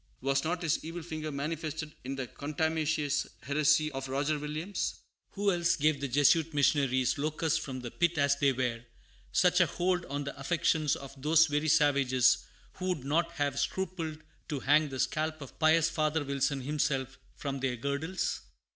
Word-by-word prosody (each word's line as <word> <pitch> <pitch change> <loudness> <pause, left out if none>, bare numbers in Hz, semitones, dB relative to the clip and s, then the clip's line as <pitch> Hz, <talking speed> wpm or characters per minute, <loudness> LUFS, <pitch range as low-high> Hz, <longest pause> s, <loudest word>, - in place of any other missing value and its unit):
Was 135 +1 +1
not 175 +2 -2
his 160 -2 0
evil 165 +1 -6
finger 155 -2 -5
manifested 155 +1 -4
in 135 +2 -4
the 135 -1 -3
contumacious 155 +1 -1 0.2
heresy 150 +2 +2
of 135 -1 -5
Roger 145 +3 0
Williams? 155 +6 -3 0.4
Who 200 0 +1
else 170 -2 +2
gave 150 -1 +1
the 140 - -1
Jesuit 145 +4 +3
missionaries 135 -3 +2
locusts 155 +2 0
from 130 -4 -6
the 120 -1 -6
pit 175 -1 +1
as 140 -1 +3
they 140 -1 +3
were 125 -2 -2 0.5
such 180 0 +4
a 175 - +5
hold 180 +1 0
on 145 +1 -3
the 140 - -6
affections 155 0 +1
of 135 -1 -9
those 160 +2 +5
very 150 0 -1
savages 140 -4 +4 0.4
who 185 - -4
would 180 -8 -1
not 165 +5 0
have 145 -3 -1
scrupled 175 -5 -2 0.3
to 145 -4 -3
hang 150 +2 +3
the 130 -1 -6
scalp 155 +3 -1
of 140 -3 -11
pious 160 +1 +4
Father 155 -1 0
Wilson 140 0 -1
himself 135 -1 -1 0.2
from 140 -1 -4
their 130 -2 -1
girdles? 140 +8 -2
150 Hz, 170 wpm, -30 LUFS, 140-160 Hz, 0.5 s, a